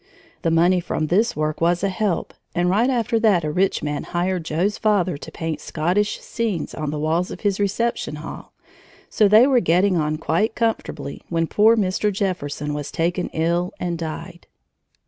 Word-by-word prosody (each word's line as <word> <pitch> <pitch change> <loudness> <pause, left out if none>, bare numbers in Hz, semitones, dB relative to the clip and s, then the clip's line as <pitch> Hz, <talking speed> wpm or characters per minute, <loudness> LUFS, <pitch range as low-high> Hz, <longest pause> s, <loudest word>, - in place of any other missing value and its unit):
The - - +1
money 175 +3 +4
from 170 -2 -2
this 205 +9 +2
work 155 +1 -2
was 175 +2 +2
a 200 - +2
help, 190 -1 -1 0.2
and 175 +1 +2
right 225 +7 +3
after 230 -3 +1
that 205 -7 +3
a 150 - -1
rich 185 +4 +1
man 150 -1 -2
hired 180 0 -2
Joe's 180 +7 -1
father 195 -5 +2
to - - -10
paint 165 -1 -4
Scottish 180 +7 0
scenes 220 -9 -3
on 155 -2 -3
the 150 - -3
walls 160 +4 0
of - - -8
his 200 -1 0
reception 205 -4 -1
hall, 150 +1 -9 0.6
so 215 - +4
they 215 +4 +7
were 265 -2 +4
getting 180 +1 +2
on 155 -1 0
quite 165 +7 0
comfortably 190 - -2
when 165 -1 +1
poor 220 +6 +4
Mr. 205 +1 +1
Jefferson 150 -7 -2
was 145 -1 -4
taken 175 +2 -1
ill 170 +3 0
and 175 -2 -2
died. 160 -2 -7
180 Hz, 180 wpm, -22 LUFS, 160-205 Hz, 0.6 s, they